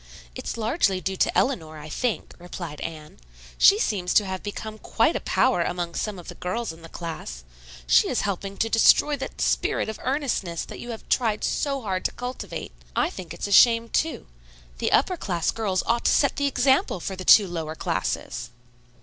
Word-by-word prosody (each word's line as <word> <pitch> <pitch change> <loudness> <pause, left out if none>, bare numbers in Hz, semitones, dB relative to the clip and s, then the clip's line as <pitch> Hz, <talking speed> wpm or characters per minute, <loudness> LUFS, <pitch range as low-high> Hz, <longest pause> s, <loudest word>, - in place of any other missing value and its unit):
"It's - - -5
largely 220 - +1
due 190 +2 -3
to - - +1
Eleanor, 160 - 0
I 150 0 -9
think," 230 +8 -2
replied 175 -3 -7
Anne. 155 -2 -7 0.4
"She 400 - +7
seems 190 - -1
to 210 - +5
have 190 -1 -4
become 215 +1 -6
quite - - +1
a - - 0
power 255 -9 +2
among 175 0 -2
some 210 +1 -3
of 175 - -11
the - - -6
girls 185 +2 -3
in 165 - -15
the 165 - -11
class. 160 - -7 0.4
She - - +5
is - - 0
helping 195 0 -3
to 225 - +1
destroy 230 +6 +5
that 270 - -7
spirit - - +1
of 220 - -6
earnestness 255 - -1
that - - -9
you 240 - -8
have 225 -2 -7
tried 220 -4 +1
so 275 -3 -1
hard 185 -3 -2
to - - +1
cultivate. 250 +1 -6 0.2
I - - +1
think 180 -4 -9
it's - - -5
a 205 - -4
shame, 230 +2 +6
too. 320 +6 -1 0.5
The - - 0
upper 360 +7 +3
class 175 - -1
girls 195 -5 -1
ought 235 +1 0
to - - +5
set 280 - +3
the 285 - +1
example 265 -6 +2
for 190 +3 -4
the 185 - -7
two 200 +2 +7
lower 160 -3 -4
classes." 115 -6 -3
200 Hz, 195 wpm, -25 LUFS, 175-240 Hz, 0.5 s, She